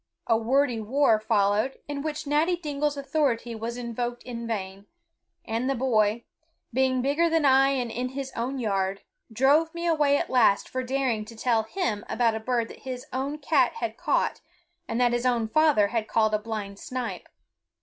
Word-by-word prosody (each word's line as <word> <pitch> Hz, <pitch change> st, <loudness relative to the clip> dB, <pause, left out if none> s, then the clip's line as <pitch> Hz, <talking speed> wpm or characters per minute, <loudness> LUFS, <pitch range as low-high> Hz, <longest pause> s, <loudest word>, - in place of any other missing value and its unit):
A 230 Hz, -, +3 dB
wordy 245 Hz, +2 st, +1 dB
war 230 Hz, 0 st, +3 dB
followed, 215 Hz, +3 st, +1 dB
in 285 Hz, -1 st, -4 dB
which 305 Hz, 0 st, -4 dB
Natty 305 Hz, +5 st, +2 dB
Dingle's 295 Hz, -3 st, -2 dB
authority 275 Hz, -5 st, 0 dB
was 230 Hz, +2 st, -5 dB
invoked 240 Hz, 0 st, -4 dB
in 235 Hz, -2 st, -6 dB
vain; 195 Hz, -2 st, -5 dB, 0.6 s
and 230 Hz, +4 st, -1 dB
the 275 Hz, -, +1 dB
boy, 230 Hz, -3 st, +1 dB, 0.5 s
being 260 Hz, 0 st, +2 dB
bigger 300 Hz, +5 st, +2 dB
than 325 Hz, -2 st, +2 dB
I 270 Hz, 0 st, +5 dB
and 245 Hz, -4 st, -2 dB
in 250 Hz, +2 st, -3 dB
his 265 Hz, 0 st, -5 dB
own 250 Hz, +4 st, -2 dB
yard, 195 Hz, -4 st, -1 dB, 0.3 s
drove 290 Hz, +8 st, +3 dB
me 340 Hz, 0 st, -4 dB
away 300 Hz, -4 st, +3 dB
at -, -, -3 dB
last 230 Hz, -6 st, +4 dB
for 255 Hz, -, -3 dB
daring 255 Hz, -4 st, -1 dB
to 230 Hz, -, -11 dB
tell 225 Hz, 0 st, +1 dB
him 220 Hz, -, -2 dB
about 230 Hz, -1 st, +2 dB
a 220 Hz, -, -3 dB
bird 235 Hz, 0 st, -1 dB
that -, -, -11 dB
his 255 Hz, -1 st, -6 dB
own 275 Hz, +3 st, -2 dB
cat 295 Hz, -, +2 dB
had 460 Hz, -, -4 dB
caught -, -, 0 dB, 0.5 s
and 230 Hz, -, -2 dB
that 245 Hz, -1 st, +3 dB
his 240 Hz, +1 st, +1 dB
own 235 Hz, -3 st, +1 dB
father 285 Hz, -5 st, +3 dB
had 225 Hz, -1 st, -2 dB
called 220 Hz, -1 st, +2 dB
a 215 Hz, -, +2 dB
blind 210 Hz, -2 st, -6 dB
snipe. 255 Hz, -2 st, -5 dB
245 Hz, 180 wpm, -26 LUFS, 225-280 Hz, 0.6 s, I